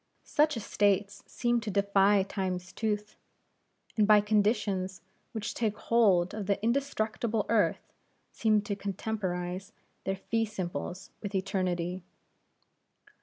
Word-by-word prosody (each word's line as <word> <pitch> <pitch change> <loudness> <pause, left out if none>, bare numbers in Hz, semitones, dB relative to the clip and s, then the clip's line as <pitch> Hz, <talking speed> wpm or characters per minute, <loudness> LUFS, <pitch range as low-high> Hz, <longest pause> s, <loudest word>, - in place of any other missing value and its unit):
Such 300 -3 +2
estates 200 -2 +1
seem 240 -1 +1
to 220 -2 -5
defy 200 0 +4
Time's 185 -2 -3
tooth, 210 -1 -2 0.8
and 210 -2 +3
by 210 -1 +8
conditions 205 -3 +1 0.3
which 220 -2 -4
take 215 -3 -1
hold 200 -7 +3
of 210 -3 -4
the 200 -1 +1
indestructible 230 -3 0
earth 220 -2 +1 0.4
seem 215 -2 +2
to 205 0 -2
contemporize 190 -2 -3 0.3
their 195 - 0
fee 225 +4 -1
simples 185 -2 -5
with 205 -1 -5
eternity. 185 -2 -1
205 Hz, 115 wpm, -30 LUFS, 190-220 Hz, 0.8 s, by